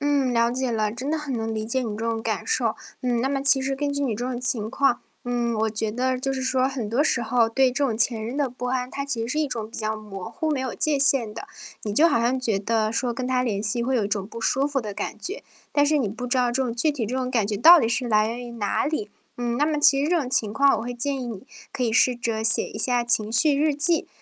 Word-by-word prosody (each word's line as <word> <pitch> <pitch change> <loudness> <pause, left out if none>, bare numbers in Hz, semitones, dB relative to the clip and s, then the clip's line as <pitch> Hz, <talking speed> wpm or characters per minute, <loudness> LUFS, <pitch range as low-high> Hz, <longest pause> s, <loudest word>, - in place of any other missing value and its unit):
嗯， 285 -3 +1
了 235 0 +2
解 255 -1 -2
了， 215 -1 0
真 245 +5 -5
的 320 - +1
很 300 -3 -5
能 225 -1 -3
理 215 0 -3
解 235 +4 -1
你 230 - -3
这 225 - -4
种 230 -1 -1
感 220 -2 -2
受。 450 - +1 0.3
嗯， 245 -2 0
那 260 - 0
么 275 0 -1
其 275 0 +4
实 270 0 -2
根 285 +1 -1
据 285 0 -2
你 250 -6 0
这 240 - -4
种 250 -1 -3
情 235 -4 -1
况， 265 0 +1 0.2
嗯， 240 -1 -1
我 220 0 0
觉 215 0 -2
得 255 +2 0
就 270 +1 -2
是 260 -1 -3
说 260 0 +1
很 255 -6 -4
多 245 +6 +2
时 260 -5 +1
候 230 0 +2
对 260 +3 +3
这 280 +3 0
种 230 -4 -2
前 230 -1 +1
任 240 +5 -5
的 280 -3 0
不 250 0 -6
安， 250 0 -2
它 280 - -4
其 275 -5 -3
实 230 - -4
是 300 - -1
一 310 - +1
种 225 -5 -5
比 240 - -9
较 215 0 -1
模 210 -2 -8
糊， 310 +7 -3
没 295 - 0
有 260 -2 -3
界 305 -2 +1
限 270 -5 +3
的。 225 - -8 0.4
你 210 - -3
就 325 +6 +5
好 285 - +2
像 245 +3 +1
觉 225 -6 0
得 215 +1 0
说 240 0 -1
跟 250 +1 -3
他 255 -1 +1
联 205 -4 -1
系 220 +3 0
会 260 +1 0
有 225 - +1
一 - - -2
种 200 -2 -2
不 230 - -9
舒 270 +4 +1
服 285 -2 -1
的 210 -3 -6
感 205 - -5
觉， 390 - -6 0.3
但 290 0 +3
是 305 +1 +3
你 240 - 0
不 245 +5 -6
知 250 +2 0
道 250 -1 +2
这 245 +3 -1
种 240 -3 -2
具 275 +6 +1
体 265 -7 -3
这 240 - -4
种 255 -1 -2
感 230 -5 +1
觉 210 0 -2
到 335 +11 +9
底 225 - +1
是 245 +1 -1
来 215 -1 +3
源 240 +2 -5
于 - - -8
哪 210 -4 -1
里。 285 -9 -3 0.3
嗯， 240 -1 -2
那 290 - +2
么 305 -1 0
其 285 -2 +5
实 295 - 0
这 350 -2 +3
种 265 - -4
情 215 -5 +1
况 275 +3 +4
我 - - -4
会 245 +2 -4
建 270 +3 -2
议 - - -5
你 225 -3 -7 0.3
可 - - -3
以 225 - 0
试 250 +2 +4
着 230 -2 -2
写 225 - +4
一 - - -9
下 245 -2 +1
情 220 -3 +2
绪 280 +5 +3
日 300 +1 +2
记。 320 +4 +1
245 Hz, 320 characters per minute, -24 LUFS, 225-275 Hz, 0.4 s, 到